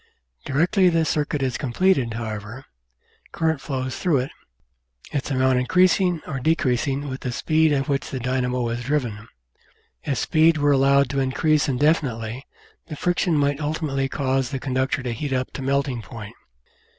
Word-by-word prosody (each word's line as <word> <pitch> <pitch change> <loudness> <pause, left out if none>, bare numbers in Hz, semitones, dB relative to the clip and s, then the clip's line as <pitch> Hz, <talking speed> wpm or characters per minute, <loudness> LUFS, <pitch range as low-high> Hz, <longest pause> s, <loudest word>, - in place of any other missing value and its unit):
Directly 180 +6 +3
the 165 -1 +2
circuit 150 -2 -1
is 130 -2 -1
completed, 135 -3 +1
however, 110 +2 -6 0.7
current 160 -3 0
flows 130 -2 -3
through 170 -6 +1
it, 130 +2 -2 0.8
its 140 -1 -2
amount 130 -1 +2
increasing 180 +4 +3
or 135 -3 -4
de 160 +6 +2
creasing 135 +1 -1
with 130 -1 -5
the 125 - -3
speed 155 +5 +2
at 135 -2 0
which 140 -1 -1
the 130 - -4
dynamo 125 -1 -1
is 120 +1 -3
driven. 120 -6 -2 0.8
If 140 -4 -1
speed 160 +6 +3
were 145 -1 +3
allowed 140 -1 +4
to 140 - -1
increase 140 +3 +1
indefinitely 130 -4 0 0.4
the 155 - -6
friction 175 +1 0
might 145 -1 +1
ultimately 145 -3 -1
cause 135 -2 0
the 135 - -3
conductor 130 0 -1
to 125 - -2
heat 135 +4 -3
up 130 0 -1
to - - -7
melting 135 -2 0
point. 110 -1 -9
135 Hz, 160 wpm, -23 LUFS, 125-150 Hz, 0.8 s, allowed